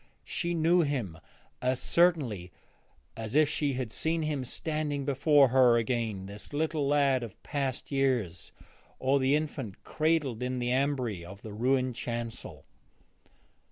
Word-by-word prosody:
She 175 Hz, 0 st, -2 dB
knew 170 Hz, +2 st, +4 dB
him 125 Hz, -, -2 dB, 0.4 s
as 125 Hz, 0 st, 0 dB
certainly 135 Hz, -, +2 dB, 0.6 s
as 110 Hz, +2 st, -5 dB
if 155 Hz, 0 st, +6 dB
she 145 Hz, -1 st, -1 dB
had 125 Hz, -3 st, -3 dB
seen 160 Hz, +4 st, 0 dB
him 150 Hz, -3 st, -1 dB
standing 145 Hz, +1 st, -2 dB
before 140 Hz, 0 st, +4 dB
her 125 Hz, -2 st, +5 dB
again, 115 Hz, -4 st, -1 dB
the 100 Hz, +1 st, -9 dB
little 155 Hz, -1 st, 0 dB
lad 140 Hz, -2 st, +3 dB
of 115 Hz, -5 st, -9 dB
past 135 Hz, -3 st, -3 dB
years, 125 Hz, -12 st, 0 dB, 0.5 s
or 135 Hz, +2 st, +2 dB
the 135 Hz, +2 st, +3 dB
infant 140 Hz, -9 st, -4 dB
cradled 155 Hz, -7 st, 0 dB
in 125 Hz, 0 st, -2 dB
the 120 Hz, 0 st, -1 dB
ambry 130 Hz, -8 st, 0 dB
of 100 Hz, +3 st, -11 dB
the 110 Hz, -, -7 dB
ruined 130 Hz, +3 st, +1 dB
chancel. 115 Hz, -1 st, -5 dB
130 Hz, 140 wpm, -29 LUFS, 115-145 Hz, 0.6 s, if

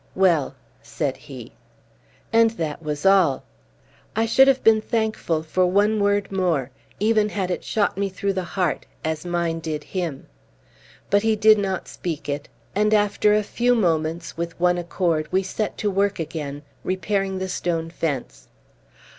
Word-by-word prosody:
"Well!" 170 Hz, -8 st, +2 dB, 0.3 s
said 140 Hz, -4 st, -3 dB
he. 130 Hz, -6 st, -11 dB, 0.8 s
And 230 Hz, 0 st, +6 dB
that 155 Hz, -1 st, -3 dB
was 150 Hz, +1 st, -4 dB
all! 190 Hz, -8 st, +4 dB, 0.7 s
I 225 Hz, +1 st, +2 dB
should 265 Hz, +4 st, +5 dB
have 270 Hz, -1 st, +3 dB
been 220 Hz, -1 st, +5 dB
thankful 215 Hz, -8 st, -1 dB
for 180 Hz, +3 st, +1 dB
one 205 Hz, +4 st, +2 dB
word 205 Hz, -1 st, +1 dB
more, 170 Hz, -9 st, 0 dB, 0.3 s
even 215 Hz, 0 st, +3 dB
had 190 Hz, -3 st, -2 dB
it -, -, -3 dB
shot 205 Hz, -3 st, 0 dB
me 200 Hz, -1 st, 0 dB
through 195 Hz, +1 st, -2 dB
the 185 Hz, -1 st, -2 dB
heart, 175 Hz, -3 st, -2 dB, 0.2 s
as 160 Hz, +2 st, -2 dB
mine 170 Hz, -1 st, -1 dB
did 155 Hz, -2 st, -4 dB
him. 170 Hz, -4 st, -4 dB, 0.9 s
But 200 Hz, 0 st, +4 dB
he 220 Hz, 0 st, +2 dB
did 215 Hz, 0 st, +6 dB
not 190 Hz, -2 st, -2 dB
speak 165 Hz, -4 st, -5 dB
it; 145 Hz, 0 st, -4 dB, 0.2 s
and, 210 Hz, +2 st, +3 dB
after 210 Hz, 0 st, +3 dB
a 210 Hz, -, +2 dB
few 245 Hz, +4 st, +1 dB
moments, 165 Hz, -4 st, 0 dB
with 170 Hz, 0 st, -5 dB
one 175 Hz, 0 st, +3 dB
accord, 170 Hz, -3 st, -1 dB
we 190 Hz, +1 st, +2 dB
set 210 Hz, +3 st, -3 dB
to 210 Hz, -, 0 dB
work 200 Hz, +1 st, +1 dB
again, 150 Hz, -3 st, -5 dB, 0.2 s
repairing 195 Hz, +1 st, -1 dB
the 190 Hz, 0 st, -3 dB
stone 165 Hz, -3 st, -2 dB
fence. 140 Hz, -, -4 dB
185 Hz, 160 wpm, -23 LUFS, 160-205 Hz, 0.9 s, And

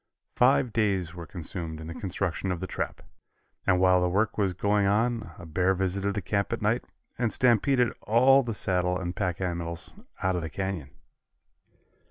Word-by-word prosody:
Five 125 Hz, -2 st, +3 dB
days 95 Hz, -6 st, +1 dB
were 85 Hz, -2 st, -8 dB
consumed 85 Hz, -2 st, -6 dB
in 80 Hz, -, -8 dB
the 85 Hz, -, -6 dB
construction 95 Hz, 0 st, -2 dB
of 90 Hz, -, -2 dB
the 95 Hz, -, -3 dB
trap, -, -, -4 dB, 0.6 s
and 90 Hz, -, +4 dB
while 90 Hz, -1 st, +5 dB
the 90 Hz, -, +2 dB
work 100 Hz, +5 st, +1 dB
was 95 Hz, -4 st, 0 dB
going 100 Hz, +1 st, +2 dB
on 115 Hz, +2 st, +1 dB
a 90 Hz, -, -10 dB
bear 90 Hz, +4 st, +1 dB
visited 95 Hz, +2 st, -1 dB
the 100 Hz, -, -2 dB
camp 100 Hz, +2 st, -1 dB
at -, -, -1 dB
night -, -, +1 dB, 0.4 s
and 120 Hz, -3 st, +1 dB
stampeded 125 Hz, 0 st, +3 dB
all 130 Hz, +5 st, +5 dB
the 115 Hz, -4 st, -4 dB
saddle 90 Hz, -2 st, +1 dB
and 90 Hz, -1 st, -4 dB
pack 90 Hz, -3 st, -1 dB
animals 85 Hz, -2 st, -4 dB, 0.3 s
out 95 Hz, 0 st, +2 dB
of 90 Hz, -, -1 dB
the 80 Hz, -, -4 dB
canyon. 95 Hz, -5 st, -4 dB
95 Hz, 180 wpm, -27 LUFS, 90-105 Hz, 0.6 s, while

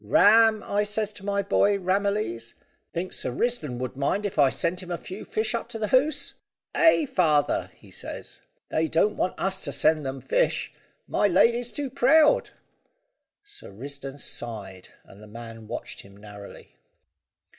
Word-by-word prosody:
`Ram,' 220 Hz, -, +5 dB
I 205 Hz, +1 st, 0 dB
says 210 Hz, 0 st, -2 dB
to 200 Hz, -, -10 dB
my 200 Hz, 0 st, 0 dB
boy 200 Hz, +1 st, +3 dB
Ramillies, 190 Hz, -, -1 dB, 0.4 s
`think 180 Hz, +2 st, -4 dB
Sir -, -, -3 dB
Risdon 150 Hz, -, -1 dB
would 130 Hz, +1 st, -4 dB
mind 140 Hz, +10 st, 0 dB
if 195 Hz, -, -3 dB
I 140 Hz, -2 st, +6 dB
sent 170 Hz, +6 st, -1 dB
him 180 Hz, -, -10 dB
a 175 Hz, -, -2 dB
few 190 Hz, +4 st, -8 dB
fish 220 Hz, +1 st, -2 dB
up 235 Hz, -, -3 dB
to -, -, -5 dB
the 215 Hz, -2 st, -2 dB
Hoze?' 275 Hz, +4 st, +2 dB, 0.4 s
"`Ay, 325 Hz, -2 st, +4 dB
father,' 155 Hz, -, +2 dB
he -, -, -18 dB
says, -, -, -7 dB, 0.3 s
`they 160 Hz, 0 st, +1 dB
don't 205 Hz, +7 st, +2 dB
want 185 Hz, -, -1 dB
us 190 Hz, 0 st, 0 dB
to 140 Hz, -, -4 dB
send 155 Hz, +2 st, +2 dB
them 135 Hz, 0 st, -4 dB
fish. -, -, 0 dB, 0.3 s
My 205 Hz, -, +2 dB
lady's 235 Hz, +6 st, +3 dB
too 280 Hz, -3 st, -4 dB
proud!'" 295 Hz, +3 st, +4 dB, 0.9 s
Sir 410 Hz, 0 st, -10 dB
Risdon 135 Hz, +5 st, -7 dB
sighed, 100 Hz, -8 st, -6 dB
and 100 Hz, -, -16 dB
the 105 Hz, -, -12 dB
man 115 Hz, 0 st, -10 dB
watched -, -, -6 dB
him 100 Hz, 0 st, -17 dB
narrowly. 105 Hz, -1 st, -12 dB
185 Hz, 165 wpm, -26 LUFS, 130-220 Hz, 0.9 s, I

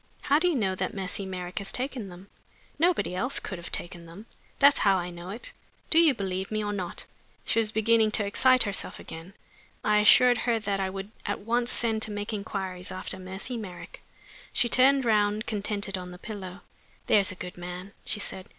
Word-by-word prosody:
"How 290 Hz, +1 st, +3 dB
do 360 Hz, -, +2 dB
you 345 Hz, -, +2 dB
know 195 Hz, -7 st, +1 dB
that 185 Hz, +1 st, -3 dB
Mercy 195 Hz, +1 st, -3 dB
Merrick 180 Hz, 0 st, -4 dB
has 200 Hz, -, -3 dB
taken 250 Hz, -5 st, -4 dB
them?" 180 Hz, +2 st, -12 dB, 0.5 s
"Nobody 340 Hz, -, +2 dB
else 250 Hz, +9 st, +1 dB
could 185 Hz, -, -6 dB
have 170 Hz, -, -8 dB
taken 175 Hz, -1 st, -4 dB
them 180 Hz, +6 st, -11 dB, 0.3 s
that's 280 Hz, 0 st, +6 dB
how 195 Hz, -2 st, +4 dB
I 175 Hz, 0 st, -3 dB
know 175 Hz, +1 st, -9 dB
it. 220 Hz, +5 st, -7 dB, 0.4 s
Do 325 Hz, -, +7 dB
you 320 Hz, -5 st, +5 dB
believe 190 Hz, -2 st, -3 dB
me 215 Hz, 0 st, -1 dB
or 205 Hz, 0 st, -2 dB
not?" 185 Hz, -4 st, -5 dB, 0.4 s
She -, -, +2 dB
as 220 Hz, -1 st, +2 dB
beginning 220 Hz, 0 st, +3 dB
to 210 Hz, -, +1 dB
excite 255 Hz, +5 st, +4 dB
herself 200 Hz, -3 st, -3 dB
again; 165 Hz, +4 st, -10 dB, 0.5 s
I 210 Hz, 0 st, +4 dB
assured 245 Hz, +3 st, +6 dB
her 235 Hz, -2 st, +1 dB
that 200 Hz, -2 st, -2 dB
I 190 Hz, -1 st, 0 dB
would 195 Hz, +2 st, -6 dB, 0.2 s
at -, -, -2 dB
once 235 Hz, +3 st, 0 dB
send 225 Hz, -2 st, -1 dB
to 220 Hz, -, +1 dB
make 205 Hz, +1 st, -4 dB
inquiries 190 Hz, -3 st, -4 dB
after 185 Hz, 0 st, -3 dB
Mercy 190 Hz, +7 st, -6 dB
Merrick. 190 Hz, -6 st, -9 dB, 0.5 s
She 240 Hz, -, +2 dB
turned 265 Hz, +2 st, +5 dB
round 210 Hz, -1 st, +2 dB
contented 205 Hz, -2 st, -2 dB
on 180 Hz, 0 st, -7 dB
the 180 Hz, -, -10 dB
pillow. 190 Hz, -2 st, -8 dB, 0.4 s
"There's 200 Hz, -3 st, +4 dB
a -, -, -8 dB
good 180 Hz, 0 st, -7 dB
man!" 180 Hz, +2 st, -7 dB
she 210 Hz, -, 0 dB
said. 190 Hz, -2 st, -5 dB
205 Hz, 200 wpm, -27 LUFS, 185-230 Hz, 0.5 s, Do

